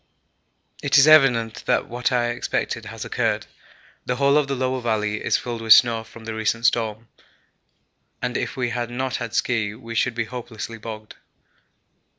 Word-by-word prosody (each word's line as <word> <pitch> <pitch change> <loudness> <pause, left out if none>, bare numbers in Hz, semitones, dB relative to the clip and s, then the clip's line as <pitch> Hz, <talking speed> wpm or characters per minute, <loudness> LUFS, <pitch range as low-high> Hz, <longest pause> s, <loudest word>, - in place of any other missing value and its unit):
It 140 +1 +3
is 135 - +8
evident 125 -8 +4
that - - +1
what 120 +1 -2
I 120 -1 +1
expected 120 - -3
has - - -7
occurred. - - -1 0.6
The 125 - -2
whole 140 +2 +3
of 150 -2 +3
the 140 - -2
lower 130 0 -1
valley 105 -2 -1
is - - +2
filled 120 -2 -5
with 110 -1 +8
snow 115 -2 +4
from 110 0 -14
the 115 - -4
recent 110 +1 -1
storm, 110 -1 0 1.1
and 125 -1 -3
if - - -3
we 125 -2 -1
had 120 -1 -3
not 130 +1 -2
had 115 -3 -5
ski 110 -4 0
we 115 0 -9
should 115 +1 0
be 120 - -1
hopelessly 115 -1 -7
bogged. 110 -1 -9
120 Hz, 170 wpm, -23 LUFS, 110-125 Hz, 1.1 s, is